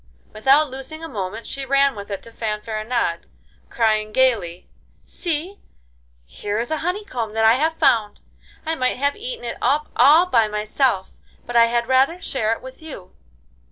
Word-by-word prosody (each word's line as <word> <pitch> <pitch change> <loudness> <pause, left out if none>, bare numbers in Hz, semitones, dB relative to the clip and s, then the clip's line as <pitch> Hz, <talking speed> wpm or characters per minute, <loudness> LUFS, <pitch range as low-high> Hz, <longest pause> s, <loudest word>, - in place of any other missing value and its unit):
Without 270 +6 +3
losing 270 +5 -7
a - - -4
moment 210 -3 -5
she 275 - -5
ran 275 +1 +3
with 200 0 -8
it 200 -2 -5
to 230 - -12
Fanfaronade, 215 -3 -3 0.4
crying 215 -2 +1
gaily: 210 -9 +1 0.4
'See, 345 +3 -4 0.7
here 205 - -4
is 235 +4 -3
a 315 - +1
honeycomb 325 - -3
that 220 0 +2
I 220 - +7
have 315 +6 0
found. 210 -3 +2 0.5
I 320 - -1
might 255 -6 0
have 285 +2 0
eaten 480 +2 -6
it - - -5
up 300 +1 +1
all 300 +8 +6
by 230 -11 +3
myself, 210 0 0 0.3
but 240 - -7
I 230 0 +7
had 235 0 0
rather 265 +7 +2
share 225 - -1
it 230 - -3
with 260 +3 -11
you. 270 -13 -10
250 Hz, 165 wpm, -21 LUFS, 215-295 Hz, 0.7 s, I